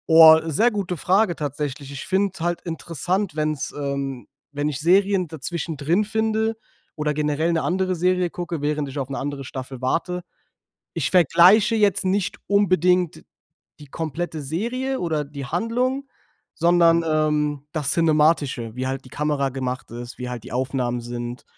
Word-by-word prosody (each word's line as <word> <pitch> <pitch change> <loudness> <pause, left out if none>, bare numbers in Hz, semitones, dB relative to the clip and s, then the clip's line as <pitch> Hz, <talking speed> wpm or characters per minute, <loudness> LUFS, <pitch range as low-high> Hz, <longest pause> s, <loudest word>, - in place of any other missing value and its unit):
Oh, 160 -1 +9
sehr 215 +10 +2
gute 195 -4 -3
Frage 185 +2 +2
tatsächlich. 145 -1 -4
Ich 140 - -7
finde 195 0 +1
halt 175 +1 -1
interessant, 170 +2 -3
wenn's, 155 -2 -2
ähm 140 -4 -3 0.3
wenn 145 +1 -1
ich 145 -3 -3
Serien 190 +1 +3
dazwischen 160 +1 -5
drin 165 +9 +1
finde 220 +1 0 0.4
oder 150 -1 0
generell 150 +2 0
'ne 165 - +1
andere 185 0 0
Serie 180 +1 +1
gucke, 170 -3 -5
während 150 -1 -1
ich 140 +2 -5
auf 135 - -3
'ne 140 - -4
andere 140 -1 -4
Staffel 130 0 -7
warte. 180 +7 -1 0.7
Ich - - -1
vergleiche 185 - +6
jetzt 205 -3 +2
nicht 190 +1 0
unbedingt 180 -3 +2 0.5
die 150 - -12
komplette 160 +2 -4
Serie 240 - -2
oder 160 -4 -1
die 140 -1 -7
Handlung, 250 - -1 0.5
sondern, 170 -1 +4
ähm, 150 -2 0
das 150 -3 -1
Cinematische, 150 -8 +2
wie 130 +1 -3
halt 135 0 -4
die - - -13
Kamera 145 0 -1
gemacht 130 -1 -4
ist, 120 +1 -8
wie 125 -1 -5
halt 125 -2 -5
die - - -11
Aufnahmen 125 -1 -1
sind, 120 +1 -6
160 Hz, 155 wpm, -23 LUFS, 140-185 Hz, 0.7 s, Oh